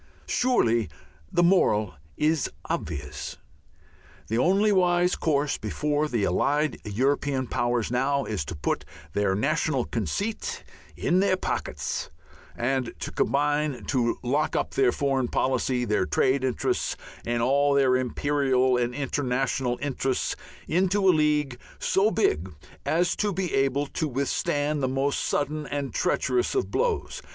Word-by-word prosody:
Surely 120 - +2 0.4
the 175 - +3
moral 110 - +3 0.2
is 155 -1 +1 0.2
obvious. 75 -4 -4 0.9
The 115 - 0
only 195 +9 +3
wise 180 -2 +3
course 145 -2 0
before 150 0 -1
the 120 -7 -1
allied 145 - +1
European 135 +5 0
powers 120 -2 -1
now 135 +3 +1
is 105 -7 -2
to 85 - -6
put 75 - -2 0.3
their 100 -2 +1
national 140 +2 0
conceit 215 - -3 0.3
in 180 +1 +2
their 190 -1 +3
pockets - - -3 0.5
and 125 0 -1
to - - -4
combine 145 -1 0
to 120 -3 +1
lock 145 +5 0
up - - 0
their 130 -3 +3
foreign 135 -2 0
policy, 130 0 0
their 105 -4 +1
trade 130 0 +2
interests, 130 -3 -1 0.3
and 120 0 -1
all 140 +3 +3
their 135 -2 +4
imperial 130 0 +1
and 120 0 -1
international 130 -2 -1
interests 135 -2 -1 0.3
into 190 +3 +2
a 185 - +7
League 150 -5 +1 0.2
so 195 +3 +2
big 95 - 0 0.4
as 175 +2 +2
to 210 -1 +1
be 185 -2 -2
able 135 +1 +2
to 155 +2 -2
withstand 145 +2 -1
the 130 - +1
most 135 +2 0
sudden 150 0 -1
and 140 -1 -3
treacherous 370 +2 +1
of 390 - 0
blows. 470 -3 -1
140 Hz, 135 wpm, -26 LUFS, 125-155 Hz, 0.9 s, a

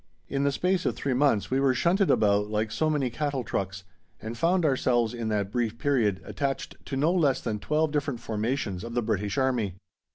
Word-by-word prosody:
In 140 0 -1
the 140 - +2
space 180 +5 0
of - - 0
three 140 - -1
months 125 -6 +2
we 130 - +2
were 135 -2 +3
shunted 185 +8 +2
about 105 0 +3
like 110 +1 -1
so 155 - +1
many 140 -5 0
cattle 140 -1 -2
trucks 95 -2 -3 0.4
and 110 +2 -6
found 170 +6 +2
ourselves, 120 -4 +2
in 120 -2 -4
that 100 -2 -1
brief 115 -1 -1
period, 115 -10 +1
attached 140 -1 -3
to 135 - -3
no 150 +5 +3
less 150 -8 +2
than 110 -3 -3
twelve 155 +6 0
different 140 -4 -1
formations 110 -3 -2
of 115 0 -6
the 120 - +1
British 105 -2 -1
Army! 125 -8 +1
125 Hz, 200 wpm, -27 LUFS, 110-145 Hz, 0.4 s, were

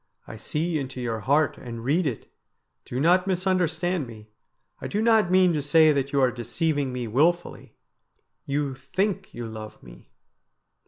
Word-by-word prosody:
' - - -40
I - - -8
see 155 +8 -2
into 130 -2 -6
your 115 -2 -2
heart 145 +6 +1
and 115 -2 -8
read 155 +6 +1
it. 120 -6 -5 0.6
Do 125 - -4
not 180 +5 +3
misunderstand 180 -4 0
me. 110 -2 -12 0.5
I - - -4
do 205 - -2
not 220 -4 +3
mean 185 -1 +4
to 150 - 0
say 155 +2 +5
that 140 -1 -1
you 140 - +1
are 130 -1 +3
deceiving 135 +4 -1
me 125 -2 -4
wilfully. 165 +10 0 0.7
You 140 -1 -1
think 190 +9 -2
you 120 - -5
love 110 -1 -9
me.' - - -15
145 Hz, 165 wpm, -25 LUFS, 125-175 Hz, 0.7 s, say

